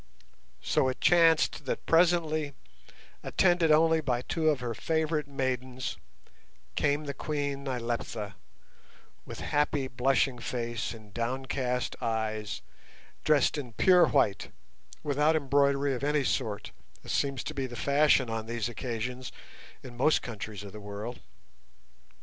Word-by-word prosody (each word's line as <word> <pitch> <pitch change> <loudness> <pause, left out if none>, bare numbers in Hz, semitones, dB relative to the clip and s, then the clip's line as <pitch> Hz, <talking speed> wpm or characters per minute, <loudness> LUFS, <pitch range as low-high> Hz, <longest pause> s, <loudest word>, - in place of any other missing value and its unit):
So - - +2
it 130 - -4
chanced 165 -2 +4
that - - -3
presently, 165 -4 +2 0.7
attended 175 -3 +3
only 160 +1 +5
by 125 -4 -1
two 160 +2 +1
of 145 -4 +1
her 120 -2 -3
favourite 160 +2 -1
maidens, 130 -2 -3 0.8
came 145 +1 +1
the 140 -1 -4
Queen 145 -2 -3
Nyleptha, 115 -4 -3 0.9
with - - -7
happy 145 -2 0
blushing 130 0 +1
face 120 -1 -3
and 105 -3 -15
downcast 125 +1 -2
eyes, 110 -5 -2 0.6
dressed 150 -1 +3
in 125 -5 -7
pure 180 - +5
white, 105 -9 +1 0.5
without 150 +2 +2
embroidery 140 -1 +2
of 125 - -4
any 145 0 +2
sort, 105 -4 -2 0.3
as - - -6
seems 140 -2 0
to 155 - -5
be 135 -3 -2
the 120 - -9
fashion 140 0 +3
on 115 -1 -4
these 115 -1 -2
occasions 125 +1 -4 0.5
in 125 -2 -10
most 145 +6 +3
countries 105 -3 -6
of 100 - -9
the 105 +1 -9
world. 105 +4 -6
130 Hz, 130 wpm, -29 LUFS, 120-150 Hz, 0.9 s, only